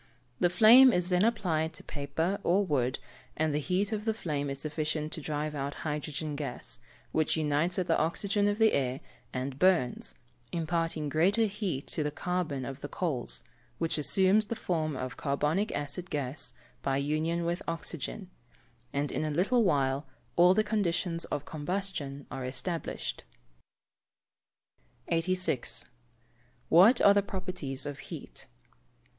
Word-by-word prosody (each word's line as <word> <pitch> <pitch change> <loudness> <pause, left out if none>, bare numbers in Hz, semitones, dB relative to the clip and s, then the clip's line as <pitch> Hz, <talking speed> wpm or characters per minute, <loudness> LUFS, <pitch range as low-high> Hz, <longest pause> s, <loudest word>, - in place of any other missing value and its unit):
The 175 - +4
flame 240 +7 +8
is 180 -4 +1
then 180 +1 +3
applied 165 -8 +1
to 155 - -10
paper 160 +7 -2
or 195 +4 +3
wood, 130 -5 +1 0.4
and 155 -1 +1
the 150 - +1
heat 185 +7 0
of 215 -1 -2
the 220 -1 +1
flame 145 -8 -2
is 140 - -3
sufficient 155 0 -2
to 160 - -4
drive 150 +1 -2
out 140 0 -3
hydrogen 150 0 -3
gas, 145 -1 -5 0.3
which 155 +1 +1
unites 155 +3 +1
with 185 - +1
the - - +2
oxygen 200 +5 +1
of 205 0 +1
the 220 -1 +4
air, 130 -1 0 0.3
and 130 +1 -4
burns, 125 - +2 0.4
imparting 165 -2 -1
greater 185 +10 +3
heat 195 -9 -3
to - - -1
the 150 - 0
carbon 155 -4 -2
of 135 +1 -7
the 145 - -4
coals, 145 -9 -2 0.3
which 160 -2 -1
assumes 195 +7 +3
the 230 - -2
form 155 -7 -1
of 130 -1 -5
carbonic 150 +8 0
acid 145 +5 -4
gas 145 0 -3 0.3
by 135 -1 0
union 155 +4 0
with 170 +1 -1
oxygen, 165 +3 -4 0.6
and 140 +1 -1
in - - -1
a 155 - -1
little 200 +11 +2
while 140 -5 +1 0.3
all 180 +2 +6
the 215 - +4
conditions 175 -5 0
of 145 - -3
combustion 155 -4 -4
are 130 - -4
established. 140 +7 -3 1.9
86. 170 -5 0 0.9
_What 205 +9 +7
are 200 - +9
the 200 - +4
properties 185 -9 -4
of 145 -2 -5
heat? - - -9
160 Hz, 150 wpm, -30 LUFS, 145-185 Hz, 1.9 s, are